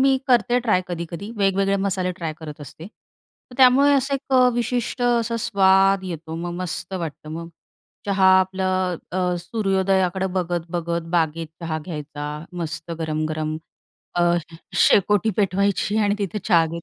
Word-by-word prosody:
मी 270 0 +4
करते 245 0 +3
ट्राय 215 -6 +2
कधी-कधी. 175 +3 -5
वेगवेगळे 195 0 +2
मसाले 190 -2 -1
ट्राय 165 -3 -4
करत 150 -1 -8
असते. 155 +3 -10
तर 225 +3 -22
त्यामुळे 270 +2 +6
असं 275 +1 +1
एक 270 0 -5
अ, 250 -1 +6
विशिष्ट 240 +1 -2
असा 235 -1 +1
स्वाद 195 -2 +3
येतो. 160 -3 -6
मग 175 +1 -4
मस्त 180 +2 -5
वाटतं. 160 -3 -6
मग 165 +1 -6 0.6
चहा 195 -1 +3
आपलं 185 -1 -1 0.2
अ, 180 -1 0
सूर्योदयाकडे 190 -2 0
बघत-बघत 170 -1 -3
बागेत 165 0 0 0.2
चहा 160 -1 -2
घ्यायचा 150 -3 -6 0.3
मस्त 165 +1 -5
गरम-गरम. 155 0 -2 0.6
अ, 175 - +2 0.6
शेकोटी 205 +2 +3
पेटवायची 200 +1 +1
आणि 205 -1 +2
तिथे 205 0 -2
चहा 170 -5 +4
घेत 170 +1 -6
185 Hz, 140 wpm, -22 LUFS, 170-205 Hz, 0.6 s, त्यामुळे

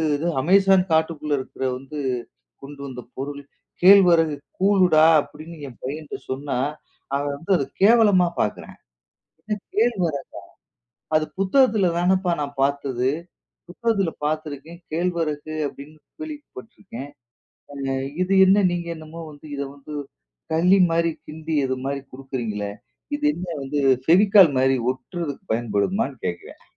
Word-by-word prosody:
எதோ 160 +4 -1
அமேசான் 190 +2 +5
காட்டுக்குள்ள 160 -2 +1
இருக்குற 130 - -7
வந்து 135 +3 -8 0.6
கொண்டு 140 +1 -10
வந்த 125 -2 -7 0.2
பொருள், 140 +1 -5 0.4
கேழ்வரகு 175 -5 +6 0.2
கூழுடா 185 -5 +5 0.2
அப்டின்னு 155 +4 -11
என் 120 - -13
பையன்ட்ட 150 +3 -5
சொன்னா, 135 0 -3 0.6
அவன் 145 0 -1
வந்து 165 +6 -5
அத 140 - -1 0.2
கேவலமா 205 -5 +6
பாக்குறான், 105 - -4 0.7
என்ன 210 -1 -3 0.2
கேழ்வரகா? 180 - +1 1.0
அது 155 - +2
புத்தகத்துல 205 -1 +3
தானேப்பா 185 +1 +2
நான் 140 -1 -6
பாத்தது. 135 -2 0 0.6
புத்தகத்துல 195 -2 0
பாத்துருக்கேன், 155 +2 -4
கேழ்வரகு 160 -3 -2 0.2
அப்டின்னு 150 +3 -12 0.2
கேள்விப்பட்டிருக்கேன். 225 - -9 0.6
அ - - -10 0.5
இது 185 +2 0
என்ன 195 +1 +5
நீங்க 175 -1 -3
என்னமோ 160 +1 -10
வந்து 145 +1 -15
இத 140 - -4
வந்து 145 +2 -11 0.6
களி 180 +4 +4
மாரி 165 0 +2 0.2
கிண்டி 160 +1 -6
இது 130 0 -1
மாரி 140 0 -2
கொடுக்கிறீங்களே, 120 -6 -4 0.5
இது 300 +1 -3
என்ன 180 -6 -6
வந்து 140 +2 -2 0.3
ஃபெவிக்கால் 195 +1 +7
மாரி 130 +1 +3 0.2
ஒட்றதுக்கு 145 +3 -6
பயன்படுமான்னு 120 - -1
கேட்குறயான். 85 - -6
160 Hz, 120 wpm, -23 LUFS, 140-185 Hz, 1.0 s, ஃபெவிக்கால்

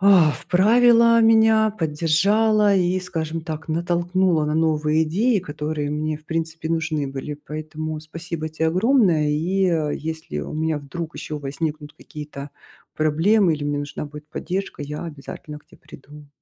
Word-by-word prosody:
а, 190 -5 +6
вправила, 230 +6 +4
меня 220 -1 +5
поддержала 200 +5 +2
и, 180 0 +2
скажем 165 -3 -4
так, 160 -1 -7
натолкнула 175 0 +1
на 150 0 -1
новые 155 -1 +2
идеи, 210 +9 +1
которые 150 -3 -4
мне, 155 +1 -2
в 155 - -19
принципе, 160 0 -3
нужны 155 -3 -1
были. 135 +2 -5
Поэтому, 155 +1 -6
спасибо 160 0 -6
тебе 160 +1 -1
огромное. 185 - +3
И, 175 +6 0
э, 160 -4 0
если 160 +1 -5
у - - -7
меня 160 0 -1
вдруг 160 +3 -7
ещё 150 - -5
возникнут 150 +1 -4
какие-то 150 -2 -9 0.4
проблемы 165 +5 +3
или 145 -1 -5
мне 145 0 -1
нужна 145 +1 -5
будет 150 +1 -11
поддержка, 185 +1 -4
я 150 +3 -6
обязательно 150 -1 -8
к - - -29
те - - -19
приду. 150 +1 -14
160 Hz, 150 wpm, -22 LUFS, 150-185 Hz, 0.4 s, а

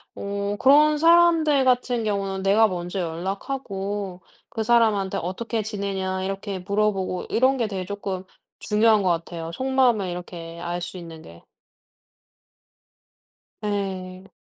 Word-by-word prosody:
어 200 0 -3
그런 300 +3 +5
사람들 330 -3 +5
같은 245 -2 +2
경우는 195 -2 -2
내가 210 +3 +5
먼저 180 +1 -4
연락하고 195 +2 -4 0.3
그 225 - -4
사람한테 220 -4 +2
"어떻게 220 +6 -3
지내냐?" 195 -3 -3
이렇게 195 0 -4
물어보고 195 -1 -1
이런 260 +3 +3
게 230 -3 0
되게 190 -3 -4
조금 195 -2 -4 0.4
중요한 215 0 +3
것 185 - +1
같아요. 165 -1 -3
속마음을 260 -5 +2
이렇게 175 -1 -7
알 175 0 -3
수 175 +2 -6
있는 165 -2 -9
게. 85 - -14 2.2
예. 190 -2 -4
200 Hz, 265 characters per minute, -24 LUFS, 185-225 Hz, 2.2 s, 그런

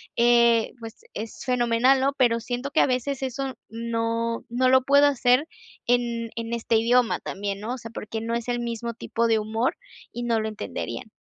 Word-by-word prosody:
eh, 235 -1 +4
pues 225 -1 -9 0.2
es 220 +2 -7
fenomenal, 250 +1 +3
¿no?, 275 +2 +1
pero 235 -3 +3
siento 245 +4 -4
que - - +2
a - - +6
veces 255 +1 -1
eso 265 +1 -3
no 230 0 -2
no 255 +2 +2
lo 260 0 +5
puedo 280 +2 +5
hacer 255 0 +3 0.4
en 235 -1 0
en 230 0 -4
este 230 -1 +1
idioma 235 +1 +3
también, 200 0 -4
¿no? 220 +4 -4
O - - -4
sea, 230 -2 -10
porque 220 0 -5
no 230 +1 -3
es 235 0 -4
el 240 0 -1
mismo 235 0 -4
tipo 230 +1 -1
de 225 -1 +3
humor 220 +4 -1 0.4
y 240 - -4
no 230 -2 +1
lo 220 - -2
entenderían. 215 -1 -6
235 Hz, 190 wpm, -25 LUFS, 230-250 Hz, 0.4 s, a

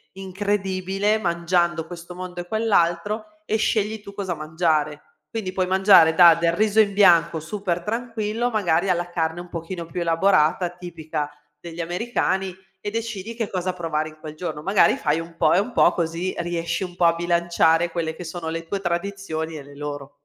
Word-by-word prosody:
incredibile, 195 +1 -1
mangiando 170 -2 0
questo 175 0 -9
mondo 180 -1 -6
e 175 - -11
quell'altro, 210 0 +1 0.2
e 220 - 0
scegli 215 0 0
tu 200 -1 -11
cosa 195 -3 -3
mangiare. 155 -1 0 0.3
Quindi 195 -5 -4
puoi 185 -1 0
mangiare 190 -4 +6
da 170 -2 +8
del 170 0 +1
riso 215 +3 +2
in 205 - +1
bianco 170 -4 +5
super-tranquillo 210 +6 -2
magari, 195 -5 +1
alla 175 -1 0
carne 165 -1 -2
un 175 - -11
pochino 170 +1 -6
più 175 +1 -5
elaborata 170 0 +3
tipica 160 -4 -5 0.3
degli 170 +1 -9
americani 190 +1 -1 0.3
e 205 - -3
decidi 230 -1 -4
che 225 -3 -3
cosa 185 -1 -2
provare 155 -3 -2
in 155 - -17
quel 155 -1 -9
giorno. 160 -3 -5
Magari 195 +3 +4
fai 155 -1 0
un 165 0 -11
po' - - +4
e 180 - +5
un 230 +5 -2
po' - - +4
così 170 +1 -2
riesci 170 +1 -2
un 180 -1 -7
po' 175 - +3
a 165 - +5
bilanciare 170 -1 +2
quelle 165 -2 -2
che 180 - -8
sono 165 0 -5
le 165 0 -4
tue 195 +2 -3
tradizioni 170 -3 -3
e 150 - -7
le 140 +1 -14
loro. 145 -1 -6
175 Hz, 180 wpm, -23 LUFS, 165-195 Hz, 0.3 s, da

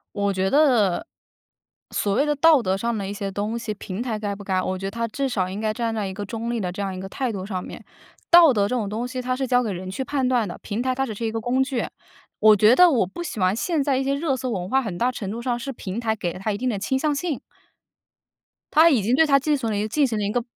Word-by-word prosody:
我 200 -1 0
觉 190 0 0
得， 260 - +3 0.8
所 200 - 0
谓 280 - +2
的 295 0 +1
道 310 -1 +5
德 190 -4 0
上 230 +4 -2
的 200 -2 -3
一 200 - -4
些 200 -1 -4
东 210 +4 -2
西 230 -2 -4
平 200 0 -6
台 230 -4 -3
该 205 -1 -3
不 205 - -10
该， 190 -1 0
我 185 0 -2
觉 195 - -6
得 - - -4
它 230 +2 -2
至 270 +5 -2
少 185 -7 -1
应 195 - -5
该 215 -1 0
站 230 0 -2
在 215 -2 -2
一 190 - -5
个 205 - -5
中 230 +3 -4
立 240 - -1
的 185 -4 -2
这 195 - -6
样 195 -1 -2
一 185 - -6
个 190 - -6
态 255 +5 -2
度 190 -3 -5
上 185 -3 -4
面。 - - -9 0.5
道 340 -3 +8
德 205 -5 +2
这 250 - -1
种 215 -5 -2
东 225 +4 -3
西， 255 0 -4
它 255 0 -1
是 265 0 -2
交 250 0 +3
给 220 - -2
人 185 0 -6
去 260 +8 -3
判 265 -1 -1
断 245 -3 +2
的， 175 - -7
平 210 +3 -3
台 255 +1 0
它 270 +1 -1
只 220 - -5
是 230 +3 -4
一 220 - -1
个 225 - -2
工 250 +4 +1
具。 265 -3 -2 0.5
我 215 0 +7
觉 215 +4 +5
得 360 +3 +7
我 250 - +2
不 345 - -7
喜 285 - -5
欢 185 +1 +2
现 320 +6 0
在 275 -1 +1
一 270 - 0
些 275 +1 0
热 280 -2 0
搜 255 0 -4
文 185 -4 -3
化， 265 +4 +3
很 205 -8 -5
大 245 +5 +1
程 200 -6 -5
度 230 +2 -5
上 240 -1 -1
是 270 +3 -5
平 200 -5 -6
台 225 -2 0
给 175 -5 -3
了 - - -9
它 215 - 0
一 200 - -2
定 255 +4 -1
的 220 - -1
倾 265 +7 -1
向 300 0 0
性。 310 -2 -3 1.3
它 320 +2 +7
已 265 -9 +3
经 225 +6 0
对 320 - +5
它 280 -2 +5
进 295 +2 +1
行 235 -5 -2
了 210 - -1
一 210 +1 -1
进 280 +6 +2
行 225 -3 -2
了 210 - -1
一 200 - -1
个 245 - 0
230 Hz, 325 characters per minute, -23 LUFS, 200-265 Hz, 1.3 s, 道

